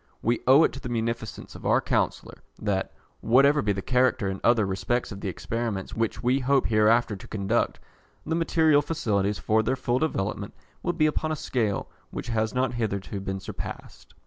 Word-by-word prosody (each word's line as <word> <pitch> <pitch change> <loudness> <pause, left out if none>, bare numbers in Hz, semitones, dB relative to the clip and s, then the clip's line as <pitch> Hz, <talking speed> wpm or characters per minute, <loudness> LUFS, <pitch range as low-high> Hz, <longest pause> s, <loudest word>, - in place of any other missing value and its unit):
We 120 0 +2
owe 135 +5 +8
it - - +2
to 135 - -7
the 130 -2 -6
munificence 115 -1 -3
of - - -11
our - - +3
Chancellor, - - -2 0.2
that, 100 -2 -1 0.3
whatever 140 +5 +4
be 105 - +1
the 95 -1 -3
character 130 -4 +2
in 95 0 -5
other 115 -3 +4
respects 95 +7 -1
of 100 -1 -7
the - - -3
experiments 110 +1 -3
which 115 0 -2
we 125 +3 +3
hope 135 +1 +2
hereafter 110 0 +3
to 95 - -11
conduct, 105 +2 0 0.5
the 160 - -1
material 160 -3 +3
facilities 105 -10 0
for 110 +1 +2
their 120 +4 0
full 125 -1 0
development 105 -9 -2 0.3
will 175 - -1
be 160 -3 +2
upon 155 +1 0
a - - 0
scale 110 -8 -1 0.2
which - - -6
has 110 -1 0
not 130 -1 0
hitherto 100 -4 -3
been 95 0 -4
surpassed. 95 - -8
115 Hz, 185 wpm, -26 LUFS, 105-130 Hz, 0.5 s, owe